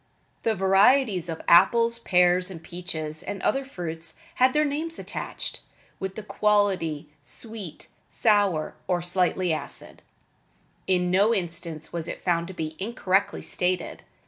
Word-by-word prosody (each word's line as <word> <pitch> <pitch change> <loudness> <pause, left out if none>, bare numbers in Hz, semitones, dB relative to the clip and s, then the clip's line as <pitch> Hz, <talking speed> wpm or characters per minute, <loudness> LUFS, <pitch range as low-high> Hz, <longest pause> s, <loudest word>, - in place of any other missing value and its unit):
The 225 -1 +1
varieties 195 0 +4
of 165 - -5
apples, 230 +7 +5
pears, 180 -2 +3
peaches 160 -3 -4
and 200 - -5
other 270 - +1
fruits 165 - -2 0.2
had 255 0 +6
their 300 +2 +2
names 315 +3 -2
attached, - - -5 0.4
with 190 0 -4
the 215 - -6
quality, 195 -8 +1
sweet, 220 -8 -7 0.2
sour, 205 -8 +2
or 175 -1 0
slightly 180 -1 +1
acid. 155 - -7 0.9
In 180 -1 +2
no 205 +5 +4
instance 170 -4 -4
was 170 -1 -3
it - - -6
found 170 -2 +1
to 190 - -8
be 155 -2 -4
incorrectly 195 -2 0
stated. 180 -1 -2
185 Hz, 130 wpm, -26 LUFS, 170-210 Hz, 0.9 s, had